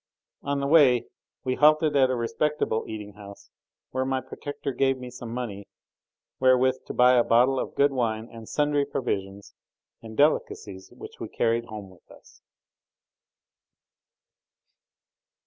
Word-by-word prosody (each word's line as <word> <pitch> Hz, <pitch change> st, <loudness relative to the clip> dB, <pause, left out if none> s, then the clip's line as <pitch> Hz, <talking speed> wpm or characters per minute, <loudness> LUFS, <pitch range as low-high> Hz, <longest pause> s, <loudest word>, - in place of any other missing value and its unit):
On 140 Hz, 0 st, -2 dB
the 140 Hz, -, -2 dB
way 140 Hz, -6 st, +5 dB, 0.4 s
we 130 Hz, -, -1 dB
halted 155 Hz, +2 st, +4 dB
at 135 Hz, -2 st, +4 dB
a 130 Hz, -, 0 dB
respectable 120 Hz, 0 st, -1 dB
eating 105 Hz, -2 st, -7 dB
house, 100 Hz, -1 st, -13 dB, 0.4 s
where 130 Hz, 0 st, -1 dB
my 130 Hz, 0 st, -1 dB
protector 140 Hz, +2 st, -6 dB
gave 135 Hz, +1 st, +1 dB
me 125 Hz, -1 st, -9 dB
some 120 Hz, -2 st, -8 dB
money 115 Hz, -5 st, -5 dB, 0.7 s
wherewith 130 Hz, 0 st, +4 dB
to -, -, -5 dB
buy 125 Hz, 0 st, +5 dB
a -, -, +4 dB
bottle 125 Hz, +4 st, +3 dB
of -, -, -5 dB
good 140 Hz, 0 st, +3 dB
wine 115 Hz, -4 st, -2 dB
and 115 Hz, -2 st, -12 dB
sundry 145 Hz, -1 st, +1 dB
provisions 100 Hz, -7 st, -4 dB, 0.5 s
and 110 Hz, -1 st, -11 dB
delicacies 105 Hz, -9 st, 0 dB
which -, -, -12 dB
we -, -, -6 dB
carried 115 Hz, 0 st, 0 dB
home 105 Hz, -4 st, -9 dB
with 90 Hz, -, -22 dB
us. -, -, -19 dB
125 Hz, 140 wpm, -26 LUFS, 110-135 Hz, 0.7 s, way